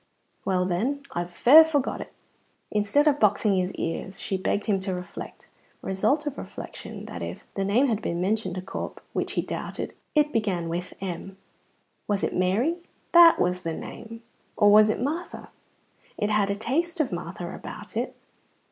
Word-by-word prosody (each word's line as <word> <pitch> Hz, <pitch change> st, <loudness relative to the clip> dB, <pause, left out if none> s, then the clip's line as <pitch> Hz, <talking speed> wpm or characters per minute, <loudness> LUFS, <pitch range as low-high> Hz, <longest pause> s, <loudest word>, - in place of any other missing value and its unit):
"Well, 185 Hz, -1 st, +1 dB
then, 240 Hz, +11 st, -1 dB
I've 175 Hz, 0 st, -3 dB
fair 280 Hz, -, +8 dB
forgot 295 Hz, -4 st, -1 dB
it." -, -, -9 dB, 0.6 s
Instead 210 Hz, +9 st, +2 dB
of 290 Hz, -1 st, +3 dB
boxing 210 Hz, -1 st, +3 dB
his 185 Hz, 0 st, 0 dB
ears 175 Hz, +3 st, -4 dB
she 195 Hz, -, -2 dB
begged 190 Hz, +2 st, -1 dB
him 205 Hz, -3 st, +1 dB
to 190 Hz, -1 st, -2 dB
reflect. 180 Hz, -1 st, -8 dB, 0.4 s
Result 275 Hz, +11 st, +1 dB
of 295 Hz, -2 st, -4 dB
reflection, -, -, -8 dB
that -, -, -7 dB
if -, -, -6 dB
the 195 Hz, -, -1 dB
name 210 Hz, +8 st, +3 dB
had 225 Hz, -5 st, 0 dB
been 170 Hz, -4 st, -2 dB
mentioned 190 Hz, 0 st, 0 dB
to 185 Hz, -, -4 dB
Corp, -, -, -6 dB
which -, -, -2 dB
he -, -, 0 dB
doubted, -, -, -5 dB, 0.2 s
it 300 Hz, 0 st, +3 dB
began 190 Hz, -7 st, 0 dB
with 175 Hz, +2 st, -4 dB
M. 190 Hz, +1 st, -5 dB, 0.7 s
Was 205 Hz, -1 st, 0 dB
it -, -, -1 dB
Mary? 210 Hz, -, +1 dB, 0.3 s
That 340 Hz, -1 st, +8 dB
was 180 Hz, +1 st, +1 dB
the 165 Hz, -2 st, -3 dB
name. 230 Hz, +7 st, -8 dB, 0.3 s
Or 205 Hz, -1 st, +6 dB
was 215 Hz, +1 st, +7 dB
it -, -, 0 dB
Martha? 310 Hz, +8 st, -4 dB, 0.7 s
It 210 Hz, +1 st, 0 dB
had 210 Hz, -2 st, +2 dB
a 200 Hz, -, 0 dB
taste 320 Hz, -, -1 dB
of 295 Hz, -5 st, +1 dB
Martha -, -, -5 dB
about -, -, -9 dB
it. -, -, -2 dB
205 Hz, 175 wpm, -26 LUFS, 185-270 Hz, 0.7 s, fair